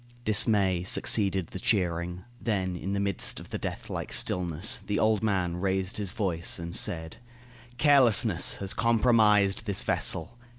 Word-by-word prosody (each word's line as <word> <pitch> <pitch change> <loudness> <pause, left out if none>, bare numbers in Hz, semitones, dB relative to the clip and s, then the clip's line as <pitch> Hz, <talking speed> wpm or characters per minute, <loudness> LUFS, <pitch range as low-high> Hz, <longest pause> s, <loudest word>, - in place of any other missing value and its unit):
Dismay 100 -4 +2
succeeded 95 -2 +2
the 95 - -6
cheering. 90 -3 -1 0.2
Then 95 -5 -2
in 95 +3 -5
the 100 - -1
midst 100 -2 -1
of - - -13
the - - -5
death - - -6
like - - -6
stillness, 90 +6 -1
the 105 - -4
old 110 0 +1
man 95 -5 -1
raised 95 0 -2
his 100 -3 -3
voice 90 -4 -2
and 85 +1 -7
said: 80 -6 -2 0.6
"Carelessness 120 - +4
has 95 -1 -2
compromised 110 -3 +2
this 100 -2 0
vessel. 85 +9 0
95 Hz, 145 wpm, -27 LUFS, 90-110 Hz, 0.6 s, Carelessness